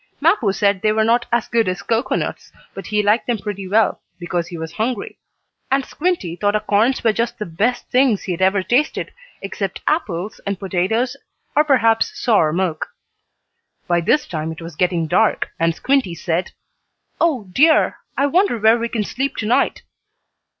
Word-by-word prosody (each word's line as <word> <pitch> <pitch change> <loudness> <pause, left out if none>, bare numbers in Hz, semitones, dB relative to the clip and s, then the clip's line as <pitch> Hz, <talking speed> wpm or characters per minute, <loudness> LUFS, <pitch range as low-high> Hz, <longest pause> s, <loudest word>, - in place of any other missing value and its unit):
Mappo 305 - +3
said 200 -1 +1
they 215 - +2
were 220 0 +2
not 235 +2 +2
as 235 -1 +1
good 230 -2 +1
as 185 -1 -2
cocoanuts, 230 +2 -2 0.2
but - - -8
he 210 -1 +1
liked 210 +3 +2
them 240 -2 +1
pretty 200 -2 -6
well, 215 +4 +2 0.2
because 175 -1 -2
he 175 -2 -7
was 160 0 -6
hungry. 220 +4 -3 0.5
And 270 0 +1
Squinty 330 - -2
thought 205 +3 0
acorns 215 +4 +1
were 225 -2 +3
just 235 +2 -2
the 210 - -4
best 220 +9 -1
things 250 -5 +2
he 185 - -4
had 175 - -4
ever 190 0 +3
tasted, 255 +9 0 0.3
except 195 -1 -4
apples, 210 - -1
and 200 -1 -1
potatoes 200 +8 -1 0.4
or 300 - +5
perhaps 230 -6 +2
sour 205 -10 +3
milk. 175 -1 -1 1.0
By 175 -1 +2
this 295 - +2
time 160 -1 -4
it 160 - -9
was 165 -2 -9
getting 175 -1 0
dark, 190 +6 +1
and 165 0 +1
Squinty 260 -9 +1
said: 170 +1 -2 0.7
"Oh 270 - +1
dear, 310 - +4 0.2
I 280 - +3
wonder 345 - +2
where 220 +2 +4
we 235 0 -2
can 220 -3 -1
sleep 270 +6 -3
tonight?" 225 +2 +1
215 Hz, 170 wpm, -20 LUFS, 180-245 Hz, 1.0 s, or